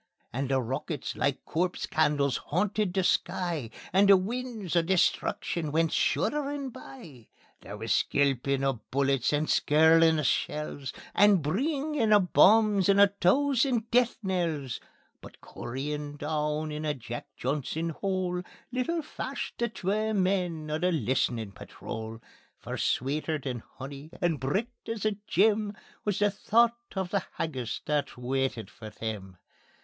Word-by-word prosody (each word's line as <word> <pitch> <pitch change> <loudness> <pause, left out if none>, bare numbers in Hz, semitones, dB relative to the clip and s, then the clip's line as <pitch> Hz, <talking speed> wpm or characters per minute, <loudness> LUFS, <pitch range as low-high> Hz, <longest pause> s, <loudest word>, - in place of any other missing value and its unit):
And 135 +2 -2
the 135 -1 +2
rockets 135 +4 -3
like 140 -1 -1
corpse 180 +2 -1
candles 145 -3 +1
hauntit 205 +4 +1
the 190 +1 0
sky, 170 -8 0 0.2
And 195 +1 +5
the 195 - +9
winds 220 -2 -4
o' 170 - +5
destruction 170 -2 0
went 165 +1 +2
shudderin' 285 -2 0
by. 220 - -12 0.3
There - - -9
wis - - -1
skelpin' 140 -1 +1
o' 135 -4 0
bullets 135 -1 +1
and 150 +1 +1
skirlin' 160 +1 +5
o' - - 0
shells, 145 0 -1 0.2
And 200 -4 +5
breengin' 275 - 0
o' 210 - +8
bombs 200 +1 +5
and 200 0 +5
a 200 0 +8
thoosand 240 +4 +2
death 245 0 +3
knells; 165 -9 -1 0.4
But - - -13
cooryin' 145 +4 -5
doon 150 +1 -1
in 150 +1 -4
a 150 -1 0
Jack 120 -2 -7
Johnson 150 +5 -2
hole 185 +1 -2 0.3
Little 280 +7 -1
fashed - - -5
the 235 0 +1
twa 215 +2 -1
men 180 -5 0
o' 155 - -1
the 180 +2 +2
List'nin' 120 - 0
Patrol. 110 +4 -7 0.4
For - - -6
sweeter 150 +4 0
than 130 -4 -5 0.2
honey 140 +3 -8
and 165 -4 +1
bricht 215 - -3
as 225 -2 -3
a 215 -2 +1
gem 210 +1 +2 0.3
Wis 205 -3 0
the 205 0 +3
thocht 235 +2 +1
o' 190 - +2
the 190 0 -1
haggis 130 -7 -3
that 150 -4 -1
waitit 130 -2 -2
for 110 -2 -10
them. 105 -4 -6
165 Hz, 145 wpm, -28 LUFS, 140-205 Hz, 0.4 s, the